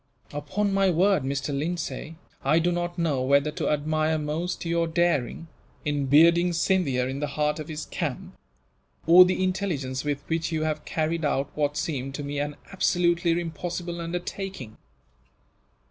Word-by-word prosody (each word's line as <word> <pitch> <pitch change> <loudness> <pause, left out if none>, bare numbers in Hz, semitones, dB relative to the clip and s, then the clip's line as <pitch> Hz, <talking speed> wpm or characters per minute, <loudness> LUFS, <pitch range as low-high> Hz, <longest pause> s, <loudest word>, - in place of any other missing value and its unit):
"Upon 185 +8 -1
my 195 -1 +3
word, 185 +1 +3
Mr. 140 +2 -2
Lindsay, 155 0 -3 0.3
I 150 +4 +3
do 170 +2 +2
not 175 0 -2
know 155 -6 0
whether 140 +3 +3
to - - -2
admire 155 +1 +1
most 160 +5 -3
your 170 0 +1
daring, 165 -3 0 0.4
in 145 -2 0
bearding 170 +5 +5
Scindia 165 -7 +1
in 135 +1 -4
the 150 - -1
heart 150 +2 -1
of 155 - -6
his 155 -1 -5
camp; - - -4 0.7
or 175 +2 +9
the 185 +1 0
intelligence 165 -9 -2
with 145 -1 -2
which 165 +1 -1
you 155 -1 -1
have 155 -1 -2
carried 160 +1 -1
out 140 -1 0
what 145 -1 0
seemed, 135 -3 -3
to 145 - -5
me, 145 0 -3
an 145 0 -2 0.2
absolutely 175 -2 +2
impossible 170 +1 -4
undertaking. 175 - -5
160 Hz, 155 wpm, -26 LUFS, 145-175 Hz, 0.7 s, or